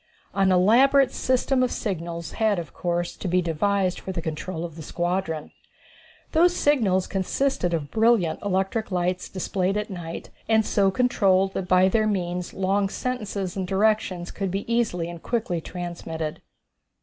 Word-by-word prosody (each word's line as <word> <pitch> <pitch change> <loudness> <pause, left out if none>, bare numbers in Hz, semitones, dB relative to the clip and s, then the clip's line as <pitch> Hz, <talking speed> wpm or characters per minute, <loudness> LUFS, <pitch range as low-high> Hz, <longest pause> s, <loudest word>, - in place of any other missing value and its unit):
An 195 -1 +3
elaborate 250 +9 +5
system 255 +1 +1
of 255 - +1
signals 170 -5 -4
had, 220 -3 +1
of 170 -3 -6
course, 175 -1 -2
to - - -5
be 180 +1 +2
devised 185 +3 0
for 190 - -6
the 180 - -3
control 165 +2 -4
of 165 -3 -8
the 165 - -8
squadron. 175 0 -2 0.8
These 350 +2 +4
signals 215 - +2
consisted 195 +1 0
of 155 -4 -2
brilliant 225 -7 +2
electric 195 +3 -1
lights 180 0 -1
displayed 190 +1 -1
at 210 0 -3
night 170 -3 -7 0.2
and 220 -1 +4
so 195 -2 +3
controlled 195 -4 +2
that 185 - -3
by 185 +1 +5
their 215 +3 +2
means 180 -3 -2
long 195 +1 0
sentences 205 -6 -3
and 190 -2 -2
directions 195 -3 +1
could 195 -2 -3
be 195 +2 -3
easily 195 -8 0
and 170 -1 -8
quickly 210 -8 -1
transmitted. 165 -3 -5
190 Hz, 155 wpm, -25 LUFS, 175-215 Hz, 0.8 s, elaborate